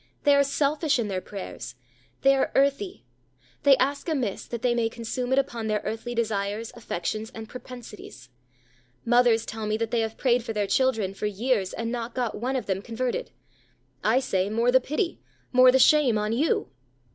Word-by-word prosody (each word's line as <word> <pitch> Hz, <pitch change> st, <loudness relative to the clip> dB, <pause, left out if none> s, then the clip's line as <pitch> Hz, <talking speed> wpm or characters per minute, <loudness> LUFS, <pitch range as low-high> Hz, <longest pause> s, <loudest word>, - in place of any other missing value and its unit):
They 290 Hz, -, +5 dB
ARE 280 Hz, 0 st, +5 dB
SELFISH 285 Hz, +2 st, +1 dB
IN 225 Hz, -4 st, -1 dB
THEIR 185 Hz, -1 st, -2 dB
PRAYERS; 185 Hz, -, -8 dB, 0.5 s
they 275 Hz, 0 st, +6 dB
are 270 Hz, -, 0 dB
earthy; 280 Hz, +8 st, +1 dB, 0.6 s
they 280 Hz, -2 st, +6 dB
ask 280 Hz, +5 st, 0 dB
amiss, 255 Hz, -11 st, -2 dB
that 235 Hz, 0 st, -6 dB
they 245 Hz, -1 st, +3 dB
may 235 Hz, -1 st, +1 dB
consume 240 Hz, +2 st, -4 dB
it 265 Hz, -, +3 dB
upon 235 Hz, -5 st, -1 dB
their 215 Hz, -1 st, -1 dB
earthly 235 Hz, +2 st, -4 dB
desires, 215 Hz, 0 st, -2 dB
affections, 215 Hz, -1 st, -4 dB
and 220 Hz, 0 st, -7 dB
propensities. 245 Hz, -, -11 dB, 0.8 s
Mothers 240 Hz, -1 st, +4 dB
tell 220 Hz, -1 st, -5 dB
me 215 Hz, +1 st, 0 dB
that 225 Hz, 0 st, -2 dB
they 235 Hz, -, +1 dB
have 225 Hz, 0 st, -2 dB
prayed 245 Hz, -2 st, +2 dB
for 225 Hz, -, -4 dB
their 210 Hz, -1 st, 0 dB
children 220 Hz, -4 st, +1 dB
for 210 Hz, -, -3 dB
years, 210 Hz, -1 st, 0 dB
and 230 Hz, 0 st, -4 dB
not 235 Hz, -1 st, -4 dB
got 245 Hz, -4 st, -1 dB
one 250 Hz, +5 st, -2 dB
of 255 Hz, -, -2 dB
them 190 Hz, -1 st, -1 dB
converted. 250 Hz, -, -3 dB, 0.7 s
I 225 Hz, +4 st, +4 dB
say, 195 Hz, -7 st, 0 dB
"More 230 Hz, +3 st, +2 dB
the 260 Hz, +1 st, +5 dB
pity; 305 Hz, +7 st, -2 dB, 0.3 s
more 255 Hz, 0 st, +7 dB
the 265 Hz, -, +4 dB
shame 265 Hz, -3 st, +5 dB
on 210 Hz, +1 st, -1 dB
you." 290 Hz, +7 st, 0 dB
235 Hz, 185 wpm, -26 LUFS, 215-260 Hz, 0.8 s, more